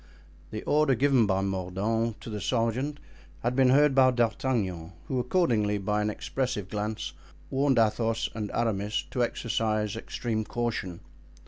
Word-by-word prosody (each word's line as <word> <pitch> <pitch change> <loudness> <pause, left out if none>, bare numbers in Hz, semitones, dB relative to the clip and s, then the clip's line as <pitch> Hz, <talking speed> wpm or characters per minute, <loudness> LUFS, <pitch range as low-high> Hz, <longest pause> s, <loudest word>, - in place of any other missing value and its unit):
The 110 - -5
order 150 -3 +3
given 130 -3 +3
by 95 -1 +1
Mordaunt 100 +4 -1
to 115 - -7
the 105 -1 -4
sergeant 125 +7 0 0.4
had 120 +2 0
been 130 -1 +5
heard 145 +2 +5
by 130 -1 +6
D'Artagnan, 110 -8 -1
who 130 - -1
accordingly, 120 - +2
by 105 +2 0
an 105 - 0
expressive 105 -3 -3
glance, 105 +1 -3 0.4
warned 135 -1 +2
Athos 115 0 +2
and 105 -2 -4
Aramis 105 -3 0
to 125 - -1
exercise 110 -3 -1
extreme 115 0 -3
caution. 110 -7 -3
115 Hz, 140 wpm, -28 LUFS, 105-125 Hz, 0.4 s, by